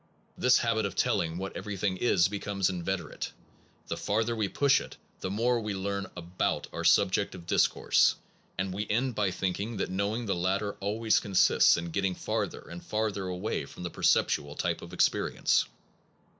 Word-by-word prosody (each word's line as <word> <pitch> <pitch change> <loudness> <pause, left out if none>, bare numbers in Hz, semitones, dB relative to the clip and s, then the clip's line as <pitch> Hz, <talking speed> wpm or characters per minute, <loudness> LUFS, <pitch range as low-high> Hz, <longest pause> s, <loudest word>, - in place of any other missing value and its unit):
5 - - -14
This 125 0 +6
habit 110 -3 +1
of 95 - -9
telling 80 0 +1
what 95 +1 -5
everything 100 -1 -2
is 90 -5 +3
becomes 100 -1 -1
inveterate. 90 -2 -4 0.5
The - - -3
farther 110 +3 0
we 110 -3 0
push 140 +5 +3
it, - - -10 0.2
the 95 - -3
more 120 +5 +1
we 105 -3 -3
learn 100 0 -3
about 85 +1 -2
our - - -4
subject 100 0 +3
of 85 -2 -11
discourse, - - +3 0.4
and 95 +1 -2
we 105 +2 -3
end 125 +4 +1
by 105 -3 +1
thinking 100 +4 -3
that 95 - -2
knowing 100 +5 -1
the 100 - 0
latter 95 +4 -1
always 110 +3 +1
consists 95 -3 +4
in 85 0 -4
getting 95 0 0
farther - - -3
and 85 0 -10
farther 105 -3 -2
away 90 +4 -3
from - - -10
the 85 - -4
perceptual 70 0 +1
type - - -1
of - - -10
experience. - - +2
100 Hz, 170 wpm, -29 LUFS, 90-105 Hz, 0.5 s, This